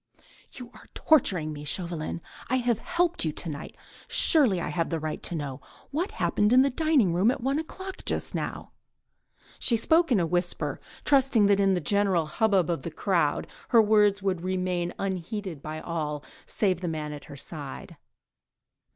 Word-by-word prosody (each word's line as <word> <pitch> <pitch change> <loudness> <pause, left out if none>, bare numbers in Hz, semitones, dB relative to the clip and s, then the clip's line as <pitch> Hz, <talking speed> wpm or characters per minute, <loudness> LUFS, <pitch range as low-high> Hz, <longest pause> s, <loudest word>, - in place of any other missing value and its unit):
"You 250 -2 -9
are - - -16
torturing 180 - +2
me, 145 0 -8
Chauvelin. 170 +1 -3 0.3
I 255 - +2
have 240 -3 +1
helped 350 +5 +1
you 160 - 0
to 170 - -3
night... 145 +1 -8 0.3
surely 255 - +4
I - - -3
have 165 -2 -1
the 165 - -2
right 155 0 -4
to 175 - -2
know. 145 -3 -5 0.3
What 335 +8 -2
happened 210 +1 +1
in 255 +1 +7
the 275 - +1
dining 280 - +2
room 185 +6 +3
at 260 - 0
one 270 +4 0
o'clock 375 +4 -7
just - - -1
now?" - - -4 0.9
She 235 - +2
spoke 320 +7 +3
in 225 - +4
a 170 - +1
whisper, 175 +1 -2 0.3
trusting 270 -6 +4
that 200 0 +4
in 195 -1 +3
the 180 - -1
general 195 -2 +2
hubbub 195 +1 +2
of 170 -1 -1
the 170 - -5
crowd 165 -2 0 0.2
her 235 - +6
words 210 -2 +4
would 185 -3 0
remain 180 -1 -1
unheeded 190 -3 -4
by 155 +1 -6
all, 150 -3 -4 0.2
save 185 -4 0
the 180 - -3
man 155 -2 -4
at 145 - -9
her 140 - -11
side. 145 -1 -8
185 Hz, 175 wpm, -27 LUFS, 165-235 Hz, 0.9 s, in